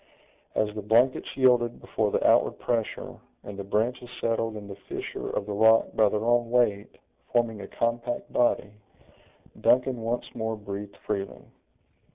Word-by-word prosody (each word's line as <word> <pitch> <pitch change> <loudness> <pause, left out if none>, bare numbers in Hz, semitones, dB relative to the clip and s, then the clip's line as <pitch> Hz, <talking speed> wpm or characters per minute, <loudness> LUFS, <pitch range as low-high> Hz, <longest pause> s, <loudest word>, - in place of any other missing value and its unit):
As 105 -1 +1
the 105 - -5
blankets 115 +5 +2
yielded 125 -3 +3
before 110 -2 -1
the - - 0
outward - - +4
pressure, 115 -3 -2 0.3
and 105 - -8
the - - -3
branches 115 +5 -1
settled 115 -1 -1
in 100 -1 -9
the 100 - -8
fissure - - -5
of - - -2
the 105 - -4
rock 110 +2 +5
by 110 -2 +4
their 105 +2 -2
own 120 0 +2
weight, 115 -5 +1 0.3
forming 115 -3 +1
a 100 - -7
compact 120 +1 -2
body, 110 -4 +2 0.9
Duncan 125 0 +3
once 115 +2 -2
more 110 -1 -2
breathed 100 -1 -7
freely. 100 -2 -3
110 Hz, 155 wpm, -27 LUFS, 105-120 Hz, 0.9 s, rock